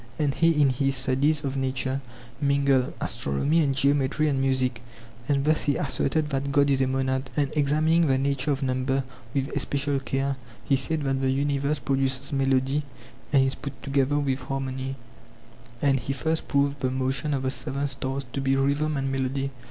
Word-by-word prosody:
And 145 -2 +1
he 165 +1 +3
in 140 -2 +5
his 135 +1 0
studies 135 +4 +2
of 135 -1 -2
nature 130 0 -1 0.4
mingled 140 -2 +2
astronomy 140 - +1
and 140 -2 0
geometry 140 +2 +2
and 135 -2 +1
musie 130 -1 +2
<and - - -18
arithmetic>. - - -13 0.5
And 140 -1 +2
thus 155 0 +2
he 145 - +2
asserted 150 +2 0
that 140 +1 -1
god 140 0 +3
is 135 -1 +2
a 130 - +2
monad, 130 0 -1
and 145 -1 0
examining 155 +3 +3
the 135 -1 +3
nature 140 +1 0
of 140 -1 0
number 130 +1 0 0.3
with 135 +2 -1
especial 140 0 0
care, 135 0 -2 0.3
he 135 - +3
said 150 +3 +1
that 135 -1 0
the 135 - +1
universe 140 +2 0
produces 135 0 -1
melody 135 +1 +2 0.5
and 135 -2 +5
is 135 - 0
put 140 -2 -8
together 140 +1 +1
with 135 -2 0
harmony, 135 0 -4 0.9
and 135 -2 +3
he 135 +3 -3
first 160 +3 -1
proved 140 0 +1
the 130 - 0
motion 130 +2 0
of 135 - -3
the 130 - +1
seven 140 +1 -2
stars 135 0 -3
to 140 - -2
be 135 0 +2
rhythm 140 +2 +1
and 135 0 -1
melody. 135 +1 -1
135 Hz, 185 wpm, -26 LUFS, 135-140 Hz, 0.9 s, in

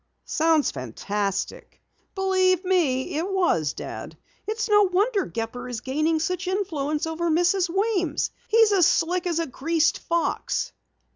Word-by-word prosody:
"Sounds 320 -2 +2
fantastic." 195 - -4 0.4
"Believe 375 -1 +2
me, 305 -7 +1
it 365 +4 -2
was, 165 - +1
Dad. - - -8 0.3
It's 440 +1 -2
no 415 -1 +5
wonder 400 +2 +1
Gepper 235 +2 -5
is 240 -2 -5
gaining 310 +5 0
such 365 +3 -2
influence 310 -7 -1
over 325 +1 -2
Mrs. 355 +3 +2
Weems. 370 -5 0 0.2
He's 450 -1 +5
as 370 -5 +5
slick 355 +2 +1
as 340 -2 0
a 335 - 0
greased 325 +5 0
fox!" 340 0 -1
340 Hz, 135 wpm, -24 LUFS, 295-380 Hz, 0.4 s, no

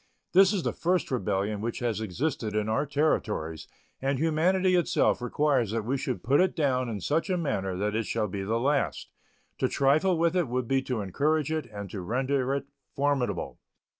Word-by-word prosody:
This 190 +1 +7
is 195 -5 -1
the - - -1
first 180 -2 0
rebellion 105 -3 -1
which 115 +1 -3
has 115 -3 -1
existed 110 - -2
in 105 0 0
our 125 +7 0
Territories, 110 - -1 0.3
and 135 0 0
humanity 175 +5 +2
itself 175 -7 +2
requires 130 -2 +1
that 110 0 -2
we 130 +4 0
should 130 -2 -3
put 140 +6 +4
it 185 - +1
down 130 -5 +1
in 105 -3 -3
such 155 - 0
a 185 - +1
manner 95 - -2
that 105 +2 -1
it 115 -1 -1
shall 105 - 0
be 100 +1 -4
the 110 +4 -1
last. 135 - 0 0.5
To - - +2
trifle 155 +7 +3
with 170 +1 +2
it 175 -5 +2
would 125 0 -2
be 135 +1 +2
to 125 -4 -3
encourage 150 - 0
it 160 -1 -2
and 100 -1 -7
to 100 - -5
render 130 +6 0
it 140 -1 -3 0.3
formidable. 135 -10 -1
130 Hz, 195 wpm, -28 LUFS, 110-155 Hz, 0.5 s, This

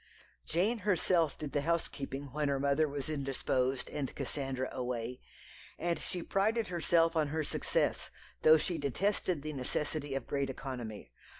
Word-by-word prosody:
Jane 205 +8 +2
herself 180 -5 +2
did 150 -2 -5
the 145 - +1
housekeeping 145 -3 -2
when 150 +1 0
her 140 -1 +1
mother 140 +3 +3
was 140 0 -4
indisposed 135 -3 0
and 140 -3 -3
Cassandra 135 -2 -2
away, 125 -1 -3 0.6
and 170 0 0
she 175 -2 -3
prided 220 +3 +1
herself 165 -1 +3
on 155 -2 +3
her 155 +2 -1
success, - - 0 0.3
though 155 0 +8
she 165 +1 -1
detested 170 - 0
the 155 0 -3
necessity 145 +1 -2
of 135 - -2
great 140 -1 -1
economy. 120 - -6
145 Hz, 145 wpm, -33 LUFS, 135-165 Hz, 0.6 s, though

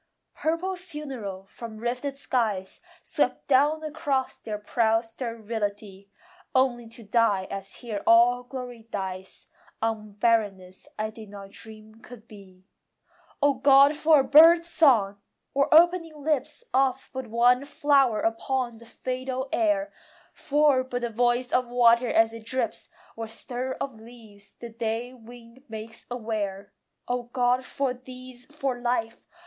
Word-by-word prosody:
Purple 335 +4 -1
funereal 270 - -7
from 220 +2 -10
rifted 250 +5 -3
skies 215 -8 -2 0.2
Swept - - -1
down 290 +3 +3
across 290 -4 -2
their 215 -1 -5
proud 225 +2 +1
sterility, 215 -4 -5 0.5
Only 245 -3 +2
to 230 +1 -10
die 205 -3 +1
as 195 0 -6
here 220 -5 -5
all 240 +2 +6
glory 245 -2 -8
dies, 190 -2 -6 0.3
On 220 -2 -3
barrenness 200 -4 0
I 215 0 -2
did 220 -1 -12
not 200 -1 -10
dream 220 +1 -12
could 235 -2 -13
be. 190 -4 -15 0.8
O 285 0 +5
God, 275 +2 +5
for 310 0 +5
a - - -2
bird 330 +4 +7
song! 225 -12 +3 0.3
or 280 0 +1
opening 330 -2 +4
lips 300 - -1
Of 265 0 +1
but 260 -2 -5
one 245 +3 +3
flower 275 -5 +2
upon 240 +1 -1
the 235 - -15
fatal 255 +2 -4
air, 305 -3 +1 0.4
For 290 -2 +2
but 250 -1 -4
the 240 -1 -2
voice 245 +2 +1
of 250 -1 +2
water 240 0 +4
as 225 0 +3
it 230 -1 -9
drips, 250 -2 -2 0.3
Or 225 0 -5
stir 250 +3 -5
of 260 -5 -6
leaves 220 -3 -14
the 235 - -8
day 230 +2 -3
wind 240 +1 -15
makes 220 +1 -9
aware! 210 -4 -4 0.3
O 245 0 -1
God, 245 +1 0
for 270 -1 -2
these, 255 0 -12
for 275 -4 -3
life! 240 -2 -2
240 Hz, 140 wpm, -26 LUFS, 220-265 Hz, 0.8 s, bird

